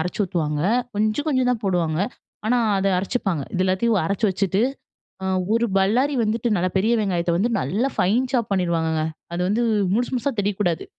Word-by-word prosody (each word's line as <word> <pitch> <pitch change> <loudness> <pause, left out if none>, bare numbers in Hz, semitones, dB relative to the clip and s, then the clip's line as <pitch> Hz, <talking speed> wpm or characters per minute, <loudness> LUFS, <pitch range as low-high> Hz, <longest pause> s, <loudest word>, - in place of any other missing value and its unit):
அரைச்சூத்துவாங்க. 170 -4 -1 0.3
கொஞ்சம் 215 +8 0
கொஞ்சம் 260 -4 +2
தா - - +3
போடுவாங்க, 170 -5 0 0.5
ஆனா 245 +3 +3 0.2
அத 195 0 0
அரைச்சுப்பாங்க. 190 - -1
இது 185 - +1
எல்லாத்தையும் 200 +4 +2
அரச்சு 200 +6 -1
வச்சுட்டு, 190 +1 0 0.6
அ - - -3 0.3
ஒரு 235 +1 +2
பல்லாரி 240 +9 +2
வந்துட்டு 225 +2 0
நல்ல 180 0 +1
பெரிய 215 +5 +2
வெங்காயத்த 175 -4 0
வந்து 215 +7 +1
நல்லா 205 - 0
ஃபைன் 240 +8 +2
சாப் 235 -5 0
பண்ணீருவாங்கங்க. 165 -4 0 0.3
அது 170 - -3
வந்து 215 +4 +1 0.3
முழுசு 245 +3 0
முழுசா 265 +3 0
தெரியக்கக்கூடாது. 195 -4 -1
195 Hz, 160 wpm, -22 LUFS, 180-235 Hz, 0.6 s, தா